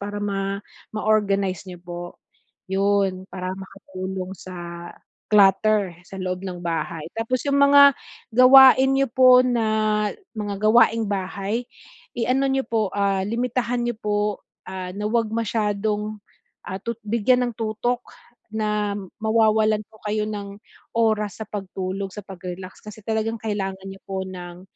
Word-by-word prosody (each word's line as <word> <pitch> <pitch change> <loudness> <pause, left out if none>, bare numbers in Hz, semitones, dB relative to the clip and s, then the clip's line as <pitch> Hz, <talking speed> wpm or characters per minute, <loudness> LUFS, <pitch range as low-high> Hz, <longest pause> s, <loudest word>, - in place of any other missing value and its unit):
para 205 +1 -5
ma, 195 0 -2 0.4
ma-organize 200 -4 +1
niyo 180 - -8
po, 175 0 -6 0.7
'yon 195 -1 +1
para 185 0 -4
makatulong 190 -1 -7
sa 175 -1 -8 0.4
clutter 205 -1 +4 0.2
sa 195 - -9
loob 185 0 -3
ng 180 -2 -6
bahay. 165 -1 -3
Tapos 235 +3 -1
yung 280 0 +2
mga 280 0 +8 0.4
gawain 265 +2 +8
nyo 275 -1 +2
po 255 -1 +7
na, 215 -3 +1 0.3
mga 205 -2 -3
gawaing 230 -1 +5
bahay, 200 +4 -2 0.5
i-ano 255 +4 +1
nyo 270 0 +1
po, 220 -3 0
ah, 200 -1 +1
limitahan 240 +2 -1
nyo 240 - 0
po, 210 -1 -1 0.5
ah, 185 -1 -5
na 210 0 -2
huwag 225 -1 +1
masyadong, 210 -1 -1 0.5
ah, 190 0 -4
tut 235 +1 -5
bigyan 245 +3 +2
ng 230 - -13
tutok 230 +3 -1 0.5
na 210 -1 -1 0.3
mawawalan 220 -1 +3
po 220 - -19
kayo 210 0 0
ng 200 -1 -6 0.4
oras 215 -3 +1
sa - - -7
pagtulog, 190 -1 -4
sa 210 - -7
pag-relax, 185 -1 -8
kasi 210 0 -10
talagang 225 0 -1
kailangan 195 -3 -3
nyo 195 0 -10
po 190 -1 -2
ng, 180 -1 -9
210 Hz, 135 wpm, -23 LUFS, 190-225 Hz, 0.7 s, mga